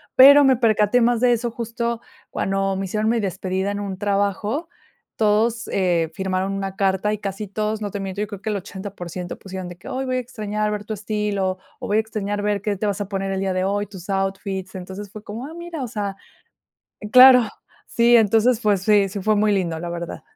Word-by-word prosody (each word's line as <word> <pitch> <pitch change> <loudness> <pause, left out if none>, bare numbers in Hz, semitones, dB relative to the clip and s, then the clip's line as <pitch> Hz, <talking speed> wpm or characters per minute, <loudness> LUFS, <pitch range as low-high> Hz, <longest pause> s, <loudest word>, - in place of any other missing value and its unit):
pero 285 +2 +9
me 265 -3 +5
percaté 220 0 +3
más 235 0 +2
de 250 -1 +5
eso 240 +1 -1
justo 235 0 -3 0.3
cuando 195 0 -1
me 195 0 -2
hicieron 215 +3 0
mi 235 0 +2
despedida 190 +1 -2
en 205 - -3
un 195 -2 -4
trabajo. 205 - -1 0.5
Todos, 225 +2 +1
eh, 175 -4 +1
firmaron 190 +1 -1
una 195 -1 -4
carta 195 +2 +1
y 210 - -4
casi 200 +1 -5
todos, 215 +2 -2
no 205 - -2
te 205 - -4
miento, 195 0 -5
yo 210 - -1
creo 200 -1 -8
que 220 - -3
el 210 - -1
80% 185 -2 -7
pusieron 190 -2 -7
de 175 - -10
que: 175 - -14
"Ay, 265 +1 -3
voy 255 -1 -1
a - - +1
extrañar 215 -4 -3
ver 210 -1 -3
tu 215 - -5
estilo", 205 -2 -2 0.2
o - - -5
"voy 205 - +2
a - - +5
extrañar 205 -2 -3
ver 205 -1 0
qué 210 -1 -1
te 205 +2 -3
vas 200 0 -1
a 205 - -3
poner 195 -1 -3
el 190 - -1
día 190 -1 -1
de 185 0 0
hoy, 205 +1 0
tus 190 -2 -11
outfits". 195 -1 -2
Entonces 190 +2 -7
fue 210 +1 -10
como: 220 +5 -6
"Ah, 305 - -9
mira". 340 -3 -6
O - - -3
sea 205 -4 -4 0.9
claro. 255 0 +9 0.5
Sí, 235 0 +5
entonces, 225 +2 +3
pues 205 -4 +2
sí, 205 0 +4
sí 200 +1 -5
fue 215 +2 +2
muy 210 0 +3
lindo, 170 -5 -1
la 175 +1 -5
verdad. 170 0 -5
205 Hz, 220 wpm, -22 LUFS, 195-220 Hz, 0.9 s, pero